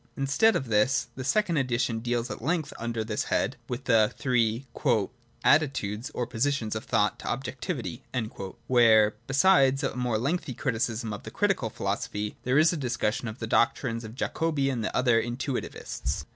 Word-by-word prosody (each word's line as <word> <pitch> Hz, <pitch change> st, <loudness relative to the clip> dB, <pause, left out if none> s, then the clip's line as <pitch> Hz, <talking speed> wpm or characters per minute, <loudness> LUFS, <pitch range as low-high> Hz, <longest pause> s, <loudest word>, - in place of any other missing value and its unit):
Instead 140 Hz, +12 st, +3 dB
of 135 Hz, -, -1 dB
this 115 Hz, +3 st, +2 dB
the 130 Hz, -, -5 dB
second 170 Hz, +5 st, +1 dB
edition 125 Hz, -3 st, 0 dB
deals 120 Hz, +1 st, -2 dB
at -, -, -6 dB
length, 160 Hz, +3 st, -1 dB
under 115 Hz, -1 st, -2 dB
this 110 Hz, -1 st, -2 dB
head, -, -, 0 dB
with 125 Hz, +2 st, -4 dB
the 110 Hz, -4 st, +4 dB
three 120 Hz, -1 st, +1 dB, 0.4 s
' 120 Hz, +4 st, -12 dB
attitudes 130 Hz, -6 st, 0 dB
(or 125 Hz, -, -1 dB
positions) 120 Hz, -1 st, -1 dB
of 110 Hz, -, -4 dB
thought 105 Hz, +1 st, +1 dB
to -, -, -8 dB
objectivity 130 Hz, +1 st, -4 dB, 0.3 s
;' 95 Hz, -1 st, -9 dB
where, 110 Hz, -4 st, +5 dB
besides 135 Hz, -2 st, +4 dB
a -, -, -1 dB
more 125 Hz, -3 st, 0 dB
lengthy 135 Hz, +2 st, -2 dB
criticism 115 Hz, -4 st, -2 dB
of 105 Hz, -, -6 dB
the -, -, -8 dB
Critical 195 Hz, -, 0 dB
philosophy, 105 Hz, +1 st, -3 dB
there 125 Hz, +2 st, +2 dB
is 160 Hz, +3 st, +5 dB
a -, -, -2 dB
discussion 120 Hz, -2 st, -1 dB
of 110 Hz, +1 st, -6 dB
the 115 Hz, -, -4 dB
doctrines 115 Hz, +1 st, +1 dB
of 110 Hz, +1 st, -9 dB
Jacobi 140 Hz, -1 st, 0 dB
and 120 Hz, -4 st, -2 dB
other 120 Hz, -3 st, +3 dB
Intuitivists. 125 Hz, +2 st, -4 dB
125 Hz, 170 wpm, -27 LUFS, 115-135 Hz, 0.4 s, where